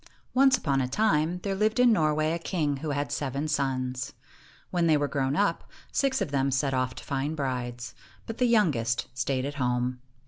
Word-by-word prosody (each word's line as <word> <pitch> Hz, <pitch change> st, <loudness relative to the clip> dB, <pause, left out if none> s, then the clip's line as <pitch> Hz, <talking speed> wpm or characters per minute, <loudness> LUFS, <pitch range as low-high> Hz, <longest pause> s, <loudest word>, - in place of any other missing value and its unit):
Once 265 Hz, 0 st, +5 dB
upon 135 Hz, -2 st, 0 dB
a 125 Hz, -, 0 dB
time, 165 Hz, +1 st, +1 dB
there 200 Hz, -, -1 dB
lived 215 Hz, +4 st, +1 dB
in 245 Hz, -2 st, +6 dB
Norway 155 Hz, -3 st, +2 dB
a 170 Hz, -, -1 dB
king 155 Hz, -5 st, -1 dB
who 155 Hz, +3 st, -5 dB
had 145 Hz, 0 st, -2 dB
seven 140 Hz, +1 st, -2 dB
sons. 130 Hz, -3 st, -2 dB, 0.6 s
When 175 Hz, -2 st, +2 dB
they 155 Hz, -2 st, +5 dB
were 145 Hz, 0 st, 0 dB
grown 135 Hz, -1 st, -1 dB
up, 205 Hz, +4 st, 0 dB, 0.2 s
six 265 Hz, -3 st, +1 dB
of 175 Hz, -8 st, -2 dB
them 135 Hz, -1 st, +1 dB
set 135 Hz, +1 st, 0 dB
off 130 Hz, -1 st, -1 dB
to -, -, -9 dB
find 140 Hz, +3 st, -2 dB
brides, 125 Hz, -3 st, -3 dB, 0.3 s
but 225 Hz, -, -7 dB
the 250 Hz, -, +4 dB
youngest 145 Hz, -, +2 dB
stayed 130 Hz, +1 st, -1 dB
at 145 Hz, -, -3 dB
home. 125 Hz, 0 st, 0 dB
145 Hz, 195 wpm, -27 LUFS, 130-175 Hz, 0.6 s, in